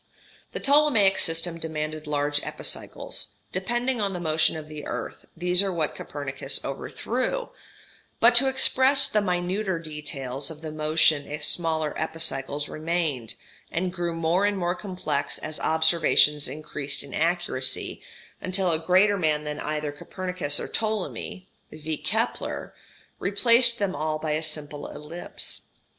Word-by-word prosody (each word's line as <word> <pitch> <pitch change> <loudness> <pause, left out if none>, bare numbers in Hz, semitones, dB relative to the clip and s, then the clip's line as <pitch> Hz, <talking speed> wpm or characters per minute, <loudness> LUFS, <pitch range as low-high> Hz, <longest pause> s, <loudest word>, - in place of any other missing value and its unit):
The - - -1
Ptolemaic 275 -9 +5
system 165 0 0
demanded 155 -1 -4
large 145 0 +1
epicycles, - - -4 0.2
depending 240 +6 -1
on 200 -1 0
the 180 - -4
motion 160 -1 +2
of 155 -1 -8
the 155 -1 -7
earth, - - -5
these 180 +2 +4
are 195 -1 0
what 160 -4 -1
Copernicus 135 -1 -2
overthrew; 255 - -2 0.7
but 235 +1 +7
to 255 +3 +6
express 265 +1 +4
the 210 - +2
minuter 185 +1 -1
details 145 -4 -4
of 160 -1 -9
the 155 - -4
motion 155 -1 +2
smaller 160 -2 0
epicycles 145 -3 -1
remained, 155 -7 -2 0.4
and 180 +1 -1
grew 175 -2 -2
more 165 +3 +1
and 205 -1 0
more 175 -1 0
complex 180 -7 -3
as 155 0 -4
observations 160 -2 +4
increased 145 0 -2
in 140 - -10
accuracy, 165 -6 0 0.4
until 185 -1 +1
a 160 - +1
greater 185 +5 +4
man 155 -3 +1
than 150 0 -4
either 150 -1 -2
Copernicus 180 0 -3
or - - -4
Ptolemy, 215 -3 -3 0.2
viz. 155 0 -5
Kepler, 225 +3 -2 0.5
replaced 235 +4 +4
them 200 -4 -1
all 155 +1 -1
by 155 0 -3
a 155 +1 0
simple 150 -2 -3
ellipse. 165 +4 -6
165 Hz, 135 wpm, -26 LUFS, 150-190 Hz, 0.7 s, but